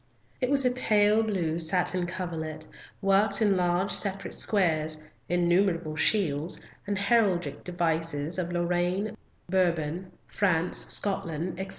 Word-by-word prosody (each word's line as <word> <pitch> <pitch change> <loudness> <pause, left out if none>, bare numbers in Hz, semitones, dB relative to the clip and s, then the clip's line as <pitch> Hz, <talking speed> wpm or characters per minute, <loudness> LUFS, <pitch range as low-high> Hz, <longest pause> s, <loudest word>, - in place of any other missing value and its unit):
It 250 - +1
was 275 -1 +5
a 250 - +4
pale 215 -3 +3
blue 175 -7 -1
satin 180 +1 +1
coverlet, 160 -4 -5 0.4
worked 195 +1 +3
in 205 -3 +3
large 180 +2 +1
separate 195 -1 -1
squares, 160 -6 +1 0.3
innumerable 175 -2 +1
shields 160 -2 0 0.3
and 205 -1 -1
heraldic 200 -3 +1
devices 165 -2 -2
of 175 -1 -3
Lorraine, 175 +4 -1 0.3
Bourbon, 175 -1 0
France, 180 -4 0
Scotland, 175 -3 -1
etc. 190 0 -4
180 Hz, 115 wpm, -27 LUFS, 165-200 Hz, 0.4 s, was